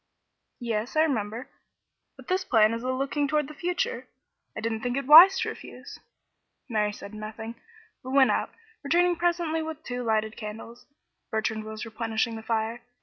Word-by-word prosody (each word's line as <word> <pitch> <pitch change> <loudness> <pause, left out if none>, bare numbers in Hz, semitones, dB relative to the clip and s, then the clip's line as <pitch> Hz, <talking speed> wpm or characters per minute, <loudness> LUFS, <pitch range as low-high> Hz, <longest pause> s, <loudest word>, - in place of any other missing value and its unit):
"Yes, 235 +1 -3
I 310 - +5
remember; 230 -5 -2 0.7
but - - -14
this 370 0 0
plan 225 -8 +4
is 230 - -4
a 255 +1 -2
looking 275 +2 -1
toward 300 -1 0
the 305 - -10
future. 360 +10 -2 0.5
I - - -4
didn't 225 0 -2
think 245 +2 -2
it 275 - -2
wise 330 +7 +10
to - - -1
refuse." - - -10 0.7
Mary 210 -4 0
said 205 0 -10
nothing, 215 +1 -7 0.5
but 260 - -9
went 270 0 +5
out, - - 0 0.3
returning 350 +4 +2
presently 340 -2 0
with 315 -1 -6
two 245 0 -4
lighted 220 -1 0
candles. 225 +2 -9 0.4
Bertrand 220 0 -2
was 220 +1 -6
replenishing 225 0 -2
the 220 - -7
fire. 225 +1 -2
240 Hz, 165 wpm, -27 LUFS, 220-305 Hz, 0.7 s, wise